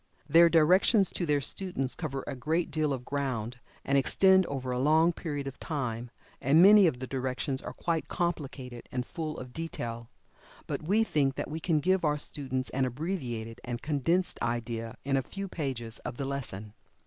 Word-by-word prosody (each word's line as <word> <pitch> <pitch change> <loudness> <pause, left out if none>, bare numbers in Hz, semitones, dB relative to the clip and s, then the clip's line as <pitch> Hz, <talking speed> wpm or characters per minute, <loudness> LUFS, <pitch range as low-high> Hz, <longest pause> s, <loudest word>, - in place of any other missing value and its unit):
Their 170 +3 +7
directions 185 +5 +4
to 175 - -2
their 145 -1 +2
students 140 -3 -3
cover 135 -5 -4
a 140 - -4
great 160 +7 -1
deal 155 -2 0
of 125 -2 -3
ground, 125 -4 -3 0.3
and 140 0 +3
extend 190 +7 +4
over 130 -2 -3
a 125 - -1
long 160 +5 +4
period 145 -5 -4
of 135 -1 -7
time, 125 -6 -3 0.3
and 140 +5 +4
many 200 +1 +8
of 130 - 0
the 130 - -5
directions 130 +1 -2
are - - -6
quite 165 -2 -2
complicated 135 -8 -4
and 125 -1 -2
full 160 -1 -5
of 125 -1 -8
detail. 120 -8 -5 0.6
But - - -3
we 200 +8 +2
think 140 -9 +1
that - - -4
we 160 - -3
can 160 -1 +1
give 185 +2 +2
our 150 -1 +2
students 130 -3 -3
an 130 0 +1
abbreviated 125 -5 -4
and 120 -1 -5
condensed 160 +5 0
idea 115 -1 -3
in 135 0 +1
a - - +2
few 195 +9 -6
pages 130 -10 -3
of 120 - -6
the 140 - -2
lesson. 110 -7 -5
140 Hz, 185 wpm, -29 LUFS, 125-165 Hz, 0.6 s, many